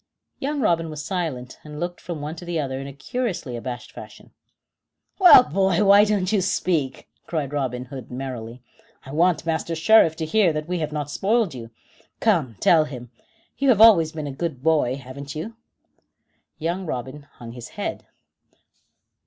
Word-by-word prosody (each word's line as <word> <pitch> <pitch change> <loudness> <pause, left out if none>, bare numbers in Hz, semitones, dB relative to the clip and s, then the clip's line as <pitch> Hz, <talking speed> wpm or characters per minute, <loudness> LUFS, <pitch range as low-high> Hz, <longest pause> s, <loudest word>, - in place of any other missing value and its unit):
Young 285 +1 -2
Robin 165 -6 +1
was 150 -1 -7
silent, 155 -9 -4
and 150 -1 -9
looked 175 0 -4
from 170 -4 -6
one 150 +2 -5
to 175 - -9
the 175 -2 -3
other 135 -2 -3
in 135 - -6
a - - -7
curiously 170 - -4
abashed 120 0 -6
fashion. - - -12 0.9
"Well, 360 -9 +9
boy, 190 +2 +1
why 200 +1 +7
don't 205 -3 0
you 210 -3 +2
speak?" 165 -7 -1 0.2
cried 150 -4 -3
Robin 130 -3 -2
Hood 130 0 -9
merrily. 125 -2 -7 0.4
"I 135 - -9
want 165 +2 +2
Master 165 0 -2
Sheriff 165 -1 +5
to 160 - -3
hear 180 0 +3
that 155 0 -4
we 180 0 -2
have 155 -1 -3
not 145 -1 -4
spoiled 210 -2 +1
you. 115 -3 -8 0.5
Come, 165 - +1
tell 160 -3 +4
him. 125 -5 -9 0.5
You 275 0 +2
have 230 -5 +4
always 195 -8 +7
been 155 -2 -6
a 145 - -4
good 135 -2 -5
boy, 150 -6 +2
haven't 140 +2 -9
you?" 210 +9 -6 1.0
Young 170 +3 -3
Robin 130 +2 -6
hung 115 -1 -10
his 120 0 -9
head. - - -6
155 Hz, 170 wpm, -23 LUFS, 135-180 Hz, 1.0 s, Well